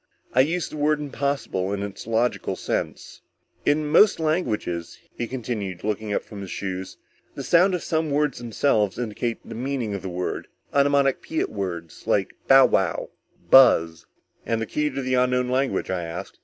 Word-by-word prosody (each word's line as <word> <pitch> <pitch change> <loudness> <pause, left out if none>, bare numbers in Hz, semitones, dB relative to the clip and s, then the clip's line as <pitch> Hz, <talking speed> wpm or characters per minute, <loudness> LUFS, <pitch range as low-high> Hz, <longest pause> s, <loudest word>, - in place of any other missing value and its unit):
I 125 - +3
use 165 +5 +2
the 155 - -8
word 150 +1 +2
impossible 140 -9 -2
in 100 0 -2
its 100 +1 -7
logical 115 +2 0
sense._ - - -4 0.5
"In 150 +1 +3
most 165 +8 +5
languages," 115 - -1 0.2
he 120 - -3
continued, 110 -8 -4
looking 105 0 -2
up - - 0
from 105 -2 -9
his 95 - -7
shoes, 95 -1 -5 0.4
"the - - -5
sound 180 +2 +4
of 175 - -4
some 160 -1 0
words 145 -2 0
themselves 110 -4 +1
indicates 120 0 -3
the - - -8
meaning 125 -2 -3
of 100 - -4
the 95 - -5
word. 90 0 -4 0.3
Onomatopoetic 140 +2 +2
words 85 -5 -6
like 95 -2 +1
bowwow, 130 -9 +4 0.4
buzz." 85 -11 +6 0.4
"And 115 -1 -1
the 115 - -2
key 150 +7 -1
to 135 -1 -4
the 130 0 -1
unknown 125 0 +2
language?" 130 -7 0
I 90 -1 -1
asked. 85 +1 -7
120 Hz, 165 wpm, -24 LUFS, 100-140 Hz, 0.5 s, buzz